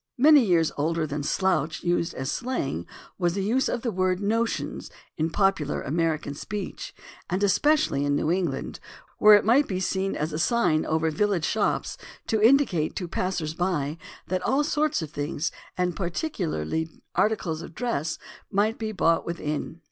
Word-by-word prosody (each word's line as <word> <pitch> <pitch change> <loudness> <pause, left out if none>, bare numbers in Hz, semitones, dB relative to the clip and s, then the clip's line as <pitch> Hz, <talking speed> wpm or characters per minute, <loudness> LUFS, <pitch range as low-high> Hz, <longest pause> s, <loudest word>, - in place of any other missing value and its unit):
Many 290 +1 +7
years 170 -6 +3
older 160 +2 0
than 145 0 -3
"slouch" 160 0 0
used 175 -1 0
as 130 +2 -3
slang 145 - -3 0.3
was 175 -1 +1
the 195 - -1
use 245 +6 +1
of 240 - -2
the 235 - 0
word 185 -1 +1
"notions" 225 +3 -1 0.3
in 160 +1 0
popular 195 -5 +1
American 155 -1 -1
speech, 200 +7 -6 0.3
and 185 +3 0
especially 205 - +3
in 145 0 +1
New 150 - +1
England, 170 -7 -2 0.4
where 210 0 +9
it 205 - +3
might 260 +6 +4
be 185 -2 -2
seen 190 +1 -1
as 150 +1 -2
a 155 - -2
sign 170 -5 +2
over 160 0 +1
village 185 0 +1
shops 215 - -1 0.3
to 220 -1 0
indicate 225 - +3
to 180 - -3
passers 170 -3 -2
by 165 -3 -1 0.3
that 185 0 -2
all 270 +4 +2
sorts 300 - 0
of 150 - -7
things, 150 +3 -2 0.3
and 180 -2 0
particularly 170 - -2 0.2
articles 180 -7 0
of 160 - -10
dress, 175 - -2 0.3
might 210 +3 +1
be 220 -1 -2
bought 165 -5 +2
within. 160 -1 -4
180 Hz, 165 wpm, -26 LUFS, 155-210 Hz, 0.4 s, where